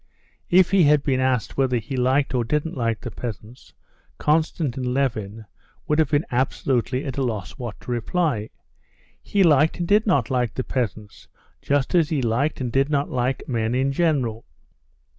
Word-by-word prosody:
If 180 0 +5
he 190 -4 +5
had 145 -1 +4
been 130 -3 +1
asked 130 -4 0
whether 130 -2 +2
he 120 +5 -5
liked 130 +2 +1
or 125 -2 +1
didn't 150 +6 -2
like 115 -4 -1
the 120 - -6
peasants, 115 +1 -8 0.5
Konstantin 150 -5 0
Levin 110 -5 -2 0.4
would 150 +1 +1
have 155 -3 +3
been 150 +1 +1
absolutely 130 +1 0
at 135 -1 -4
a - - 0
loss 110 -8 -3
what 120 -4 -6
to - - -7
reply. 120 -2 -1 0.7
He 200 -1 +1
liked 155 -2 +4
and 175 -1 -2
did 210 +3 +3
not 140 - +2
like 125 -4 0
the 130 - -2
peasants, 110 -5 -4 0.3
just 140 -1 0
as 170 -4 +3
he 155 - 0
liked 125 +7 0
and 125 -3 -3
did 135 +3 +2
not 145 -1 0
like 125 +1 -1
men 115 -1 -1
in 135 +2 +1
general. 135 -8 0
130 Hz, 175 wpm, -23 LUFS, 120-150 Hz, 0.7 s, If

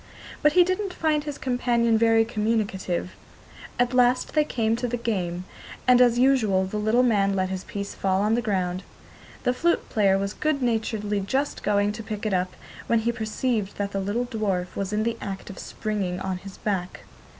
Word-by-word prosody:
But 300 0 +4
he 360 - +7
didn't 370 +1 -2
find 305 -2 +1
his 295 -2 -4
companion 240 -2 +1
very 225 0 +4
communicative. 210 -5 -1 0.7
At 245 +1 +1
last 250 0 +3
they 305 - +4
came 225 -6 0
to 245 - -2
the 245 +1 -2
game, 185 -6 -2 0.4
and, 250 0 +6
as 240 -1 +5
usual, 235 -8 +3
the 190 +3 -4
little 220 +4 +3
man 200 -5 +2
let 185 -1 0
his 190 -1 -4
piece 200 -1 -5
fall 190 0 0
on 215 +1 +2
the 240 - +2
ground. 185 -5 -1 0.6
The 250 - +2
flute 340 +7 0
player 195 -3 +3
was 200 +1 -2
good 305 -3 -1
naturedly 220 -3 0
just 265 +9 -1
going 205 0 +2
to 215 +2 -6
pick 215 -1 -5
it 215 - 0
up, 185 0 0 0.3
when 230 -1 +3
he 235 +1 +1
perceived 220 -2 -2
that 200 0 -2
the 195 - -2
little 205 +6 -1
dwarf 200 -7 -2
was 195 0 -3
in 210 +1 0
the 230 0 -1
act 195 0 -6
of 190 - -10
springing 200 -5 -3
on 190 -1 -2
his 195 0 -11
back. 185 -4 -3
215 Hz, 195 wpm, -25 LUFS, 195-245 Hz, 0.7 s, he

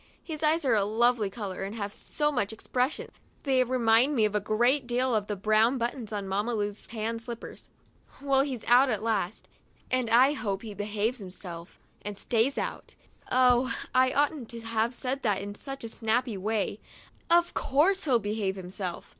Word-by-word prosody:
His 310 -3 -6
eyes 315 0 +2
are 255 - +3
a 210 -2 +3
lovely 225 0 +2
color 195 -2 -6
and 195 +3 -4
have 205 -2 -4
so 295 -1 -1
much 215 -8 -1
expres 250 +5 -1
sion; - - -8 0.3
they 265 -3 +3
remind 250 +2 +3
me 220 -4 +4
a 210 0 +1
great 240 +6 +1
deal 250 +1 +1
of 210 -2 0
the 210 - -2
brown 215 +5 +3
buttons 235 -2 -3
on 205 -2 -3
Mamma 205 +5 -1
Lu's 205 -1 -3
tan 230 0 -3
slippers. 235 0 -9 0.5
Well, 275 -1 +2
he's 265 -5 -3
out 250 +3 +6
at 215 -3 -1
last, 210 -4 -1 0.4
and 255 -2 +1
I 255 +5 +6
hope 200 -8 -3
he 215 -2 -7
behaves 210 +4 -2
himself 180 -3 -8 0.2
and 205 -1 -6
stays 235 +5 +1
out. - - -4 0.4
Oh, 250 0 +4 0.2
I 255 0 +4
oughtn't 290 -4 0
to 230 -1 -6
have 225 +1 -1
said 260 +3 -3
that 210 -5 +1
in 200 +1 -6
such 270 +5 -6
a 230 - -5
snappy 225 +1 0
way; 210 +1 -2 0.5
of 345 +1 +4
course 330 +8 +2
he 260 -5 +4
behaves 205 -2 -2
himself 185 -1 -6
230 Hz, 180 wpm, -28 LUFS, 205-255 Hz, 0.5 s, out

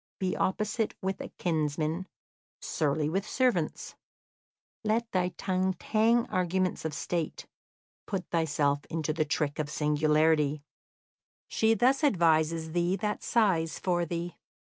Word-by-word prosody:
Be 185 -1 -1
opposite 215 +3 -1
with 190 0 -2
a - - -5
kinsman, 160 +1 -1 0.5
surly 150 -1 0
with 195 +6 -2
servants; 225 -12 0 0.9
let 220 +2 +1
thy 180 -1 +1
tongue 185 -1 0
tang 230 +3 +2
arguments 185 -2 -1
of 155 -2 -2
State; 170 -1 -3 0.6
put 190 -5 -3
thyself 145 -3 +1
into 155 -1 -2
the 155 0 0
trick 150 0 -1
of 150 -1 -1
singularity; 150 0 +2 0.8
she 225 0 +2
thus 260 +7 +3
advises 165 - +2
thee 175 +2 +1
that 210 +1 -2
sighs 185 -8 +1
for 175 -2 0
thee. 170 +1 -4
170 Hz, 120 wpm, -29 LUFS, 155-195 Hz, 0.9 s, thus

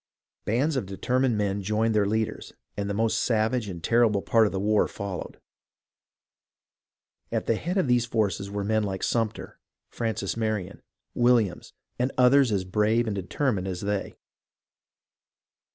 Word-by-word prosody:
Bands 135 +8 +1
of 105 - -2
determined 125 +5 0
men 100 -1 -1
joined 110 +3 0
their 105 -2 +2
leaders, 110 +1 -2 0.2
and 100 0 -3
the - - -1
most 110 +1 +1
savage 115 -1 0
and 85 -3 -7
terrible 115 -4 +3
part 115 -2 +4
of - - -3
the 95 - -2
war 105 +1 +2
followed. 100 -3 -6 1.9
At - - -1
the - - +2
head 175 - -3
of 190 - +2
these 120 -1 +2
forces 100 -3 -1
were 100 0 -3
men 110 +2 +1
like 95 -2 -3
Sumter, 115 -3 -2 0.3
Francis 110 -4 -3
Marion, 110 -4 -3 0.3
Williams, 120 -6 +2 0.3
and 125 +2 +1
others 130 0 +5
as 100 -3 0
brave 105 +5 +1
and 110 -3 -2
determined 100 +1 -1
as 90 -2 -4
they. 100 -1 -2
110 Hz, 150 wpm, -26 LUFS, 100-120 Hz, 1.9 s, others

